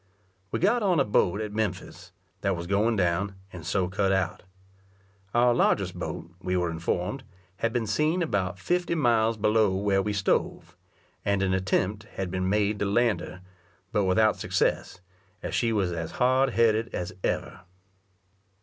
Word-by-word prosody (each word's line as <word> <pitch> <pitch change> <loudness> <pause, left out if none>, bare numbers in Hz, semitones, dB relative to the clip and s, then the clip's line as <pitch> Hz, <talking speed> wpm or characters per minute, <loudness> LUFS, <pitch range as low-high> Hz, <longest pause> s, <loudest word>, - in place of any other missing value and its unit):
We - - -1
got 220 +6 +2
on 185 -6 +2
a 135 - +3
boat 100 -1 +2
at 105 -1 -5
Memphis, 110 -3 -4 0.3
that 100 -1 +1
was 85 - -5
going 105 +5 +2
down, 95 +1 0 0.2
and 90 -2 -8
so 90 +2 0
cut 95 +1 0
out. 90 -2 0 0.9
Our 120 0 +5
largest - - +2
boat, 85 - -6
we 90 -1 -1
were 90 -1 0
informed, 90 +10 -2 0.3
had 115 - 0
been 120 -1 -1
seen 155 - +1
about 95 - -1
fifty 175 - 0
miles 115 -6 +2
below 105 -2 +2
where 95 0 +1
we 105 - -2
stove, 100 -1 -1 0.5
and 100 -1 +1
an 95 -1 +1
attempt 95 +2 0
had 95 -2 -3
been 95 0 -1
made 105 +1 +1
to - - 0
land 105 -1 +2
her, 90 +1 -9 0.5
but 105 -4 +1
without 110 +4 +3
success, 95 - -1 0.4
as - - -4
she 115 -2 +1
was 100 -5 0
as 85 -1 -4
hard 130 +2 +3
headed 115 0 +2
as 90 - -4
ever. - - -2
100 Hz, 165 wpm, -27 LUFS, 95-115 Hz, 0.9 s, Our